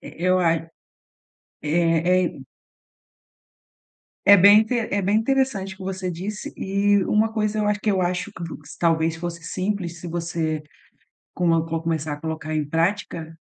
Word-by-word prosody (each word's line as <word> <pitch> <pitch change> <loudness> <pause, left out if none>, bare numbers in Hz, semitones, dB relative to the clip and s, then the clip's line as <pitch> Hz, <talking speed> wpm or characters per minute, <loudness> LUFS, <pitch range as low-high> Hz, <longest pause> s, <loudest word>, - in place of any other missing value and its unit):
E - - -10 0.2
eu 185 0 +4
a 170 -2 +3
é, 165 0 -5 0.9
é 170 +1 +1 1.8
É 200 +1 +9
bem 200 +3 +8
inte 235 +2 0
é 205 -3 -1
bem 200 +3 +2
interessante 225 -6 0
o - - -22
que - - -9
você 190 0 -4
disse, 195 +5 -6
e 200 +1 +2
uma 220 +1 +2
coisa 215 -1 -1
eu 210 - +1
acho 205 0 0
que 215 - +1
eu 190 -2 +1
acho 180 +2 -1
que 180 - -10
vo 165 - -6 0.2
talvez 165 -1 +1
fosse 170 0 -6
simples, 180 0 -3
se 175 - -8
você 165 -2 -2 0.7
como 165 -2 +2
co 165 0 -3
começar 160 -2 -2
a 145 - -9
colocar 160 -1 -4
em 155 -1 0
prática. 165 -1 -1
180 Hz, 165 wpm, -23 LUFS, 165-205 Hz, 1.8 s, É